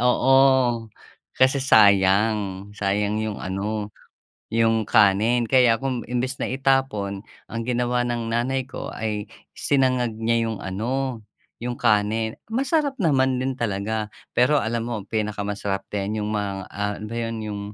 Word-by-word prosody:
Oo, 125 +2 +4 1.0
kasi 130 +1 +3
sayang, 100 -3 +3
sayang 105 +1 -1
'yong 110 -2 -3
ano, 105 +2 -3 0.6
yung 115 -1 +2
kanin. 110 +4 +3
Kaya 125 -4 +4
kung 125 -4 -2
imbes 125 +2 -2
na - - -2
itapon, 130 -7 0 0.3
ang 115 0 -3
ginawa 120 0 0
ng 120 -1 -2
nanay 130 +3 0
ko - - -6
ay 105 -2 -3 0.3
sinangag 130 -4 +1
niya 115 0 +1
yung 110 -3 -4
ano, 120 +5 -2 0.4
yung 120 0 -3
kanin. 110 -1 +1
Masarap 275 +4 0
naman 130 -7 +2
din 130 +1 -1
talaga 110 -1 -2 0.3
pero 125 +5 +4
alam 115 0 -2
mo 120 - -3
ang 100 - -13
pinakamasarap 105 -2 -2
din 105 +1 -2
yong 105 - -3
mga, 100 -2 -1 0.2
ah, 105 0 -2
ano 105 +2 -7
'yon 115 -1 -3
yung 105 -1 -4
115 Hz, 140 wpm, -23 LUFS, 105-125 Hz, 1.0 s, Oo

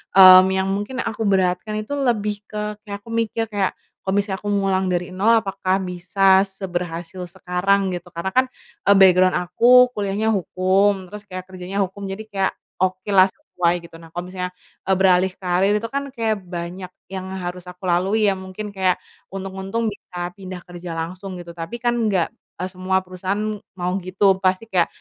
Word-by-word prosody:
mmm, 185 -1 +10
yang 190 0 0
mungkin 205 +7 -2
aku 225 -1 -2
beratkan 190 +2 +1
itu 215 - -13
lebih 210 -5 -1
ke 210 0 -4
kayak, 200 0 -6
aku 230 - -13
mikir 225 -1 -1
kayak 200 -2 0 0.2
kalo 190 - -2
misalnya 190 -2 -4
aku 205 - -7
ngulang 190 -1 +1
dari 180 0 -1
nol, 205 +5 +3
apakah 195 -1 -1
bisa 190 +2 +3
seberhasil 180 -2 -5
sekarang? 190 +3 0
Gitu, 175 0 -5
karena 175 +2 -4
kan, 255 +5 +4 0.4
eee, 200 - +7
background 185 -1 +6
aku 245 +8 +5
kuliahnya 205 0 0
hukum, 190 0 +1
terus 210 0 -9
kayak 185 -1 -6
kerjanya 185 +2 -3
hukum, 195 +1 -6
jadi 195 +3 -5
kayak 200 -3 -1 0.3
okelah 185 +1 +3
sesuai, 175 -2 -1
gitu. 170 - -13
Nah 165 - -13
kalo 175 +2 -6
misalnya, 180 -1 -4 0.3
eee, 190 - +4
beralih 185 0 +4
karier 185 +2 +1
itu 215 - -4
kan 280 0 -2
kayak 220 -3 0
banyak 180 +1 -6 0.2
yang 190 -1 -5 0.2
harus 180 0 -6
aku 180 +2 -11
lalui 195 +5 +2
ya. - - +1
Mungkin 190 +3 -7
kayak 190 -2 +2 0.4
untung-untung 195 +4 -3
bisa 175 -3 -6
pindah 185 -1 -9
kerja 175 -1 -8
langsung 185 +4 -5
gitu 175 -1 -8
tapi 165 +5 -6
kan 240 0 +1 0.2
nggak, 190 -5 +2 0.3
eee, 185 +1 -4
semua 190 0 0
perusahaan 195 +4 -3 0.2
mau 180 -1 -2
gitu, 190 +1 +2
pasti 185 +1 +1
kayak 180 -3 +3
190 Hz, 175 wpm, -22 LUFS, 180-205 Hz, 0.4 s, mmm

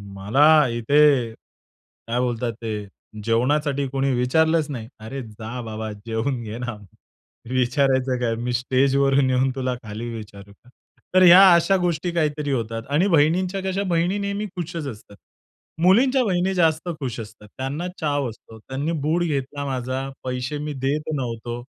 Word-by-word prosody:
"मला 145 +9 +4
इथे 140 -1 +4
काय 115 +1 -9
बोलतात 120 -1 -1
ते 105 -3 -4 0.4
जेवणासाठी 140 +5 +1
कोणी 135 0 0
विचारलंच 160 +5 +2
नाही." 115 -5 -6
"अरे 130 +5 -6
जा 110 +3 -7
बाबा 110 -1 -5
जेवून 115 +4 -3
घे 110 +1 -6
ना. 120 -2 -4 0.7
विचारायचं 130 0 +1
काय? 115 -2 0
मी 120 +1 -3
स्टेजवरून 135 +2 +2
येऊन 130 +1 +2
तुला 130 -1 -2
खाली 110 +2 -6
विचारू 100 -2 -10
का?" 125 - -24 0.5
तर 185 - +7
ह्या 180 +1 +9
अशा 170 +3 +4
गोष्टी 175 0 -1
काहीतरी 150 -3 -1
होतात 115 -2 -2
आणि 170 +7 +3
बहिणींच्या 180 +4 +2
कशा, 190 +1 -1
बहिणी 180 +1 0
नेहमी 200 +1 -2
खुशच 170 -4 -4
असतात. 105 -4 -10 0.7
मुलींच्या 250 +8 +4
बहिणी 185 0 +1
जास्त 165 -1 +1
खुश 125 -5 -4
असतात. 105 -1 -10
त्यांना 140 +7 -3
चाव 145 -4 0
असतो. 110 0 -13
त्यांनी 135 +7 -4
बूट 165 +4 +1
घेतला 140 -2 -3
माझा, 130 0 -3
पैसे 130 +3 -3
मी 150 0 -4
देत 150 +3 -1
नव्हतो. 120 -2 -4
135 Hz, 145 wpm, -23 LUFS, 120-160 Hz, 0.7 s, ह्या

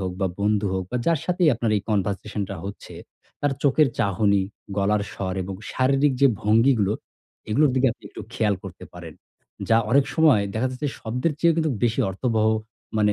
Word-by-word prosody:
হোক 95 -1 -3
বা 95 - +2
বন্ধু 105 0 +1
হোক 95 -1 -2
বা 125 - -1
যার 165 -2 +3
সাথেই 180 -2 +2
আপনার 115 0 -1
এই 100 - -2
conversation 105 +1 -1
টা 100 - -4
হচ্ছে, 100 +1 -8 0.5
তার 145 -1 +1
চোখের 145 +1 +4
চাহনি, 100 0 +2 0.3
গলার 100 +1 +1
স্বর 95 -1 -4
এবং 95 +1 -6 0.2
শারীরিক 135 +2 +2
যে 140 - +7 0.2
ভঙ্গিগুলো 110 -1 +3 0.6
এগুলোর 145 +6 +4
দিকে 130 0 +3
আপনি - - -23
একটু - - -10
খেয়াল 105 -3 +1
করতে 90 -2 -9
পারেন। 85 -3 -9 0.5
যা 115 - +5
অনেক 140 +2 +5
সময় 155 -10 +5
দেখা 115 +4 0
যাচ্ছে 130 +3 -3
শব্দের 125 +8 -1
চেয়েও 170 +1 +3
কিন্তু 160 -2 +1
বেশি 115 -1 +1
অর্থবহ 110 +2 0 0.5
মানে 105 -1 +3
110 Hz, 180 wpm, -24 LUFS, 100-135 Hz, 0.6 s, যে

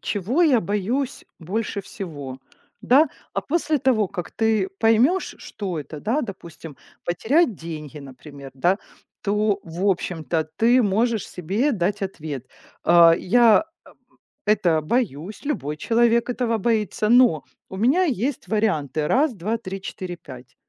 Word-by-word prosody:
чего 225 - 0
я 265 -8 +4
боюсь 210 +8 -2
больше 200 +4 -3
всего, 145 -10 -8 0.4
да? 290 +5 +5 0.2
А - - -1
после 315 -1 0
того, 240 -7 +2
как 180 -3 -6
ты 220 -4 +1
поймешь, 235 +12 +3
что 190 -7 -5
это, 150 +1 -8
да, 235 - 0
допустим, 170 - -9 0.3
потерять 235 - +2
деньги, 155 -3 -8
например, 140 0 -11
да. 175 +9 +1 0.4
То, 210 0 +1
в 175 +4 -3
общем-то, 170 -4 -1
ты 240 +3 +4
можешь 220 +1 0
себе 200 - -1
дать 200 0 -1
ответ: 150 -9 -5 0.4
а, 170 -1 +7
я, 230 - +4 0.8
э, - - +5
это 175 -6 +1
боюсь, 195 - -2
любой 150 - -2
человек 235 +5 +2
этого 240 -2 0
боится. 215 0 0
Но 240 - +5 0.3
у - - -7
меня 270 - +3
есть 270 - -2
варианты: 155 -9 0
1, 280 - +2
2, 215 +4 -2
3, 195 -3 -7
4, 185 -2 -6
5. 130 -6 -13
205 Hz, 135 wpm, -23 LUFS, 170-235 Hz, 0.8 s, а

